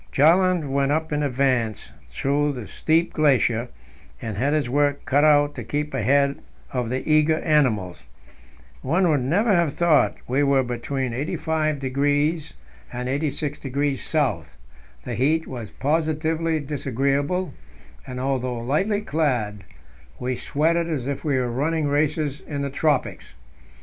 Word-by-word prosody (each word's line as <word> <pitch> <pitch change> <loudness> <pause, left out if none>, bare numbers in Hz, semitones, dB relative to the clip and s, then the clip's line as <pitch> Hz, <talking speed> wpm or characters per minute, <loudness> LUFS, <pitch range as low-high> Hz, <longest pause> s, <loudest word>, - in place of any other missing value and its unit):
Bjaaland 175 +2 +4
went 140 0 +1 0.2
in 150 0 0
advance 125 -5 0
up 65 -4 -24
through 140 - 0
this 125 -5 -8
steep 165 +2 +1
glacier, 125 -5 +2 0.5
and 110 -3 -5
had 135 +8 0
his 150 -4 +1
work 145 +2 +1
cut 145 +1 +3
out 145 -1 +4
to 125 - -6
keep 145 +7 -3
ahead 140 +3 +2 0.3
of 125 -3 -1
the 130 +2 -3
eager 155 0 +4
animals. 110 - +1 0.8
One 175 +7 +2
would 150 -4 +3
never 200 - +2
have 170 -5 +2
thought 170 -4 +3
we 130 +3 +1
were 140 -2 +3
between 125 +1 -3
85° 145 +1 -1 0.4
and 125 +1 -4
86° 145 0 -2 0.3
S.; 75 0 -21 0.5
the - - -5
heat 155 +6 +1
was 120 -5 -7
positively 160 +3 0
disagreeable, 140 +5 -1 0.5
and, 125 -1 -6
although 130 -2 -1
lightly 155 - 0
clad, 125 - -1 0.5
we 125 +1 -2
sweated 165 +6 0
as 140 -6 -2
if 140 -1 -3
we 145 -4 +1
were 125 -2 -1
running 150 +5 0
races 145 0 0
in 140 -2 -3
the 140 - -3
tropics. 145 -1 -1
140 Hz, 135 wpm, -23 LUFS, 130-155 Hz, 0.8 s, Bjaaland